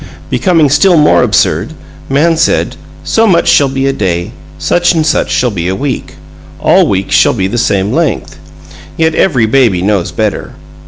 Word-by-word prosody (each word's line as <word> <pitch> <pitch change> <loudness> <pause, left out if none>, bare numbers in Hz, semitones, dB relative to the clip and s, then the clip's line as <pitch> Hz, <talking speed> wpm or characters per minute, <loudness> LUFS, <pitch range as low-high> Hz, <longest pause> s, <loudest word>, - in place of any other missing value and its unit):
Becoming 165 -6 +2
still 170 +5 +3
more 150 -1 +3
absurd, - - 0 0.4
man 155 +5 +2
said, 165 +1 0 0.3
"So 225 0 +1
much 170 -4 +2
shall 140 -2 +3
be 135 0 -2
a 135 - 0
day; 90 -7 -3 0.3
such 175 0 +1
and 160 -1 0
such 150 -3 0
shall 125 -1 0
be 90 -4 -4
a 95 - -1
week. 135 +2 -5 0.4
All - - +3
weeks 95 0 -2
shall - - +3
be 95 - -1
the 120 +5 -2
same 100 -2 0
length." - - -2 0.6
Yet 160 0 +1
every 135 -10 +1
baby 110 -6 +1
knows 95 -3 -1
better! 105 +4 -3
135 Hz, 170 wpm, -11 LUFS, 100-160 Hz, 0.6 s, still